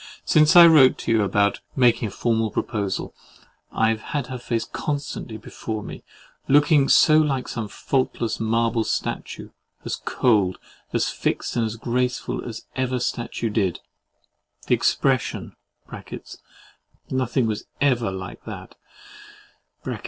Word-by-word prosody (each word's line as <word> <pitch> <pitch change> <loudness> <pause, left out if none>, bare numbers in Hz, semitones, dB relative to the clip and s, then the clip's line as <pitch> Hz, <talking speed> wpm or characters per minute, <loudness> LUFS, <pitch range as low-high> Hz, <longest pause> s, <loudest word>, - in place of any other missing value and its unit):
Since 155 +1 +4
I 175 -1 +11
wrote 150 -6 +6
to - - -3
you 110 -1 +3
about 100 +1 +1 0.2
making 120 -3 +3
a - - -7
formal 115 +1 0
proposal, 100 -3 -3 0.6
I 110 0 +2
have 110 -1 -1
had 140 0 -3
her 125 - -5
face 115 -2 -2
constantly 140 -6 -4
before 110 0 -6
me, - - -9 0.4
looking 145 0 +4
so 155 0 +6
like 135 -5 0
some 115 -3 -4
faultless 120 0 -2
marble 115 0 +1
statue, - - -4 0.3
as - - -2
cold, 105 -7 +1 0.3
as - - 0
fixed - - -2
and 115 -1 -1
graceful 125 +1 -2
as 115 -2 -8
ever 130 -1 -1
statue 120 -2 -3
did; 100 -5 0 0.9
the - - +2
expression - - 0 1.6
(nothing 130 -1 0
was 110 -2 -3
ever 125 -6 +2
like 95 -1 -8
THAT!) - - -8
115 Hz, 125 wpm, -23 LUFS, 110-130 Hz, 1.6 s, I